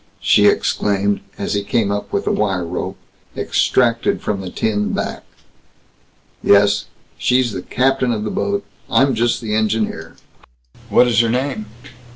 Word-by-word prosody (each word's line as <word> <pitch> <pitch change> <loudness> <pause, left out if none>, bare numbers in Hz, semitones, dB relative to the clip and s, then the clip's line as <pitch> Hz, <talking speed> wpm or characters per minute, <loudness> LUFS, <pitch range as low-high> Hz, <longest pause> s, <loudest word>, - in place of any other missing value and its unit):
she - - +4
exclaimed, 100 0 +1 0.2
as 100 - -3
he 100 - 0
came 100 0 0
up 100 0 -3
with - - -1
a - - +1
wire 95 -4 0
rope, 85 - -4 0.4
extracted 115 -2 +1
from 100 -2 -3
the 95 - -6
tin 105 +2 -1
back. - - -3 1.2
"Yes. 100 0 +4 0.3
She's 125 -1 +2
the 95 - -5
captain 130 +5 +1
of 105 -2 -2
the 105 - -3
boat. 200 0 -2 0.2
I'm 135 0 +3
just 120 +1 0
the 110 -2 -3
engineer." 110 0 -1 0.7
"What 125 - +5
is 115 -3 +2
her 115 -1 +3
name?" 125 -2 -2
110 Hz, 150 wpm, -19 LUFS, 100-125 Hz, 1.2 s, What